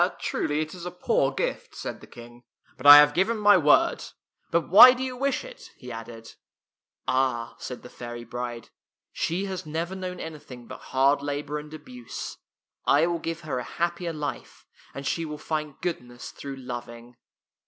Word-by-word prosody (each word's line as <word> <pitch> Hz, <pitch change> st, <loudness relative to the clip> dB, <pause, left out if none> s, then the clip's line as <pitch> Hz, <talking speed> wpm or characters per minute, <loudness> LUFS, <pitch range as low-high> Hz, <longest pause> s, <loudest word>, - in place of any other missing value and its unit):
" -, -, -23 dB
Truly 150 Hz, +1 st, -1 dB
it 155 Hz, 0 st, -5 dB
is 180 Hz, -2 st, -9 dB
a 180 Hz, -, -4 dB
poor 175 Hz, -6 st, +1 dB
gift," 135 Hz, -, -3 dB
said -, -, -6 dB
the -, -, -13 dB
King, 120 Hz, 0 st, -13 dB, 0.2 s
" -, -, -33 dB
but 135 Hz, +2 st, -2 dB
I 145 Hz, 0 st, +13 dB
have 145 Hz, 0 st, +7 dB
given 195 Hz, +8 st, +1 dB
my 205 Hz, -1 st, +6 dB
word. 150 Hz, -4 st, +4 dB, 0.5 s
But 170 Hz, 0 st, +1 dB
why 220 Hz, +7 st, +10 dB
do 255 Hz, 0 st, -4 dB
you 255 Hz, -1 st, -4 dB
wish 275 Hz, +2 st, -1 dB
it? -, -, -12 dB
" -, -, -34 dB
he 125 Hz, -1 st, -10 dB
added. 115 Hz, 0 st, -9 dB, 0.4 s
" -, -, -53 dB
Ah," 130 Hz, -3 st, 0 dB
said 125 Hz, -, -7 dB
the 125 Hz, -, -10 dB
fairy 120 Hz, 0 st, -8 dB
bride, 120 Hz, 0 st, -6 dB, 0.2 s
" -, -, -67 dB
she 180 Hz, +4 st, 0 dB
has 190 Hz, -2 st, -5 dB
never 165 Hz, +4 st, -3 dB
known 185 Hz, -1 st, -6 dB
anything 145 Hz, -6 st, -9 dB
but 130 Hz, +2 st, -10 dB
hard 135 Hz, +2 st, +3 dB
labor 145 Hz, +1 st, -3 dB
and 150 Hz, 0 st, -11 dB
abuse. 125 Hz, -6 st, -8 dB, 0.4 s
I 145 Hz, +3 st, +4 dB
will 170 Hz, 0 st, -1 dB
give 165 Hz, 0 st, -4 dB
her 150 Hz, -5 st, -3 dB
a -, -, -4 dB
happier 170 Hz, +4 st, -2 dB
life, 150 Hz, -2 st, -6 dB, 0.3 s
and 140 Hz, -, -6 dB
she 165 Hz, -, -1 dB
will 150 Hz, -2 st, -5 dB
find 150 Hz, -2 st, -4 dB
goodness 125 Hz, -8 st, -5 dB
through 140 Hz, -1 st, -8 dB
loving." 120 Hz, -2 st, -8 dB
150 Hz, 195 wpm, -26 LUFS, 125-170 Hz, 0.5 s, I